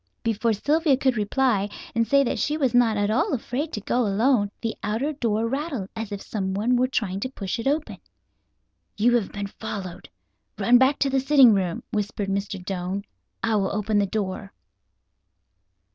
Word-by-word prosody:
Before 225 +1 +1
Sylvia 290 - +2
could 260 -2 +1
reply, 210 -1 +1 0.2
and 230 0 +1
say 280 0 +4
that 255 - -2
she 300 +1 0
was 265 -6 +1
not 235 -3 +4
at 205 +1 +1
all 285 - +1
afraid 265 +6 -3
to 210 - -3
go 240 - 0
alone, 210 +1 +2
the 225 -1 -3
outer 225 +9 -1
door 230 -5 0
rattled 270 - -3
as 225 -2 -5
if 200 -1 -5
someone 205 +4 -1
were 250 +1 +2
trying 210 -7 -2
to 260 - -3
push 200 -5 -4
it 230 - -2
open. 295 +2 -1 1.0
"You 235 +3 +3
have 210 -5 -3
been 200 0 -4
followed. 195 -3 -7 0.5
Run 245 +1 +5
back 265 +2 +4
to 275 - +3
the 270 - +2
sitting 270 -3 +6
room," 185 -4 -1
whispered 205 -1 -2
Mr. 200 0 -2
Doane. 190 +1 -3 0.4
"I 225 -1 +2
will 195 -2 0
open 210 0 0
the 200 - +1
door." 200 -1 -4
225 Hz, 175 wpm, -24 LUFS, 200-260 Hz, 1.0 s, sitting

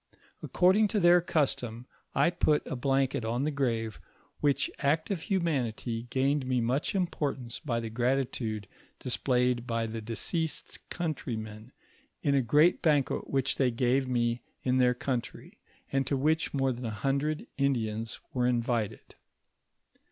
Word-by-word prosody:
According 190 +4 +4
to 210 +1 0
their 175 -1 +6
cnstom, 125 -8 -1 0.3
I 140 +5 +4
put 155 -4 +2
a - - -4
blanket 135 -1 +1
on 120 +4 -1
the 155 - 0
grave, 115 -6 -1 0.4
which 145 -2 +1
act 155 +6 +1
of 185 -5 -1
humanity 125 - -1
gained 135 +1 +1
me 130 -1 +1
mnch 125 - 0
importance 140 -9 -2
by 120 -7 -1
the 115 -1 -5
gratitude 120 -4 -1 0.3
displayed 125 -1 0
by 115 -1 0
the 115 0 -5
deceased's 150 +9 -2
countrymen, 115 -9 -4 0.5
in 140 - +2
a 140 - +4
great 150 +8 +4
banquet 145 -4 +1
which 135 -1 0
they 130 -2 +3
gave 125 +2 +1
me 120 -1 0 0.2
in 130 0 +2
their 125 -1 +4
country, 125 -1 -4 0.3
and 135 -1 +1
to 140 - +1
which 155 +4 +1
more 135 -2 +1
than 125 0 -5
a - - -1
hundred 140 +8 -1
Indians 115 -5 -1
were 125 -1 +1
invited. 120 -3 -1
130 Hz, 145 wpm, -29 LUFS, 120-145 Hz, 0.5 s, their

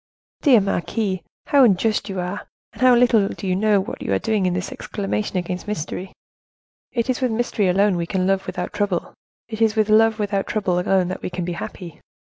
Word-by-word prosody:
"Dear 255 -8 +6
marquise, 195 +1 -1 0.3
how 280 -2 +5
unjust 215 -1 +2
you 190 -1 -3
are, 180 +3 -4 0.3
and - - -13
how 255 -1 +6
little 235 -4 +4
do - - -7
you 185 -1 +1
know 210 +1 +3
what 190 - -5
you - - -3
are - - +3
doing 210 - 0
in 180 - 0
thus 185 +1 -3
exclaiming 205 +1 -3
against 180 +2 -4
mystery; 185 -1 -4 0.8
it 235 -1 -1
is 255 0 -1
with 255 - +2
mystery 220 -3 0
alone 195 +2 +3
we 170 -1 -2
can 185 0 0
love 195 0 0
without - - -4
trouble; 205 -4 -2 0.3
it 220 0 -6
is 220 -1 +3
with 215 -1 +2
love 220 +1 +5
without 200 -2 -1
trouble 185 -5 0
alone 185 0 +2
that 185 - -5
we - - -4
can 180 -1 -4
be 175 - -3
happy. 170 -1 -8
200 Hz, 210 wpm, -22 LUFS, 185-220 Hz, 0.8 s, Dear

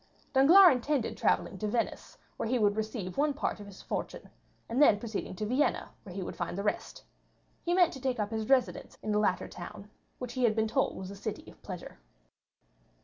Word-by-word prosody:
Danglars 340 +8 +8
intended 255 0 -1
travelling - - 0
to 215 - -1
Venice, 230 +2 -2 0.2
where 220 - -3
he 255 - +2
would 205 -3 +3
receive 215 -1 -4
one 290 -1 +2
part 290 - -2
of 205 - -9
his 200 -1 -12
fortune, - - -5 0.4
and 240 +5 0
then 250 -8 +7
proceeding 215 -4 -5
to 215 - -3
Vienna, 255 +7 +1
where 185 -4 -11
he 195 - -3
would - - -6
find 175 +1 -4
the 200 - -2
rest, 210 - -3 0.6
he 345 +1 +1
meant 360 -2 +4
to 265 - -9
take 255 -2 -1
up 210 0 -1
his 220 0 -3
residence 265 -2 +1
in 215 - -2
the 210 - +2
latter 200 -3 +1
town, 195 +3 -10 0.3
which 250 -1 -6
he 255 -1 -1
had 220 -3 +4
been 220 0 +1
told 265 +5 0
was 190 0 -6
a - - -8
city 195 - -6
of - - -22
pleasure. - - -8
220 Hz, 210 wpm, -30 LUFS, 205-265 Hz, 0.6 s, Danglars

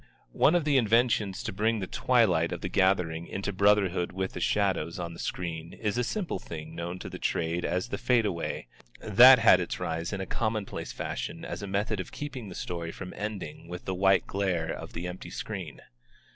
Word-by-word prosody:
One 155 - +4
of 170 -4 +2
the 145 -2 +4
inventions 115 -4 +2
to - - -4
bring 110 +3 +1
the 95 - -2
twilight 95 -8 +2
of 85 - -4
the 95 - -3
gathering 90 -3 +1
into 100 +1 -3
brotherhood 95 -3 +3
with 95 0 -3
the - - -5
shadows 95 -3 0
on 85 -2 -4
the 85 - -11
screen 85 -2 -4
is 105 -1 -2
a 125 - +1
simple 190 - -2
thing 80 -1 -8
known 85 +2 -4
to - - -7
the - - -7
trade 85 +1 -1
as 90 +1 -1
the 100 - -3
fadeaway, 105 - 0 0.3
that 125 +5 +8
had 110 -5 +6
its 85 - -3
rise 85 +1 -2
in 100 - -3
a 95 - -3
commonplace 110 +1 -3
fashion - - -5
as - - -5
a 100 - -5
method 100 +2 -1
of 95 - -5
keeping 130 -7 -6
the 90 - -8
story 85 -2 -4
from 90 - -8
ending 105 -5 -5
with 90 +1 -7
the 95 - -2
white 95 -1 +3
glare 90 -5 -1
of - - -8
the 85 +2 -4
empty 90 +1 -6
screen. - - -6
95 Hz, 200 wpm, -28 LUFS, 85-110 Hz, 0.3 s, that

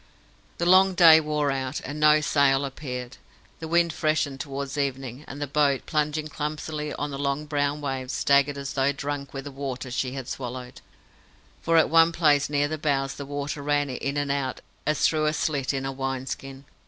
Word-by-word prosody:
The 170 - -1
long 185 +1 +5
day 165 -3 +8
wore 150 -2 0
out, 135 +1 -3
and 145 +3 -6
no 150 0 +5
sail 140 -2 +3
appeared. 125 -2 -6 0.4
The 160 - -6
wind 170 0 +2
freshened 155 -4 0
towards 140 -1 -5
evening, 135 -2 -3
and 140 - -8
the 145 - -1
boat, 140 -1 +1
plunging 150 0 -1
clumsily 150 0 -4
on 145 0 -3
the 135 - -5
long 140 +1 -1
brown 145 0 -1
waves, 135 -2 -3
staggered 140 +1 +2
as 140 0 -5
though 135 0 +2
drunk 140 0 -5
with 135 -1 -6
the 145 - -7
water 135 -2 -5
she 130 +1 -2
had 135 -2 -6
swallowed, 125 -1 -6 0.8
for 165 0 +2
at 160 - +5
one 165 0 +6
place 150 -4 +3
near 145 0 +1
the 155 +1 -4
bows 140 -2 0
the 140 - -8
water 145 0 -4
ran 145 -1 0
in 140 +3 -3
and 145 -1 0
out 140 -2 -2 0.3
as 150 0 +2
through 155 -1 +2
a 150 - +1
slit 145 -4 -1
in 135 -1 -3
a 135 - -2
wine 135 -1 -3
skin. 135 +1 -7
145 Hz, 195 wpm, -25 LUFS, 135-150 Hz, 0.8 s, day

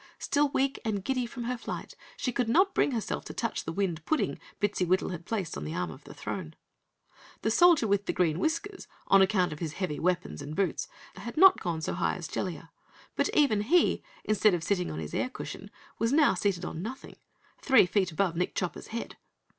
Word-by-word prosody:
Still 290 0 +1
weak 270 0 0
and 205 -4 -2
giddy 255 0 -1
from 240 +1 -6
her 245 +1 -3
flight, - - -6 0.2
she 250 - -1
could 245 -1 -1
not 380 +9 +4
bring - - +3
herself 235 -5 -2
to - - -8
touch 230 - -2
the 165 - -3
wind 170 -3 -1
pudding 315 - 0 0.2
Bittsywittle 185 -3 +1
had 175 -1 -7
placed 200 -7 -2
on 70 - -5
the 75 +2 -4
arm 90 -2 -2
of - - -13
the - - -10
throne. 80 - -5 0.9
The 220 - +2
Soldier 340 -1 +6
with 200 0 +1
Green 165 -2 +2
Whiskers, 335 +5 -2 0.2
on 195 - +7
account 190 -3 +3
of 150 - -9
his 160 -3 -3
heavy 170 -5 -3
weapons 180 -2 -1
and 145 +2 -6
boots, 190 -4 0 0.3
had 235 +6 -7
not 380 +2 +8
gone 165 -2 -2
so - - -1
high 175 - 0
as 175 -4 -6
Jellia, 165 -2 -4 0.4
but - - +1
even 245 -9 +4
he, 330 +12 +3 0.2
instead 215 -2 +3
of 165 - -4
sitting 180 0 0
on 75 - -5
his 80 -2 -6
air - - 0
cushion, - - -8 0.3
was 230 +2 +1
now 295 0 +5
seated 185 -2 -1
on 160 - -5
nothing 230 +7 -7 0.4
three 265 -8 +6
feet 185 0 +1
above 170 +1 0
Nick 180 +2 -1
Chopper's 180 -3 -3
head. 230 +1 -6
195 Hz, 205 wpm, -29 LUFS, 175-245 Hz, 0.9 s, not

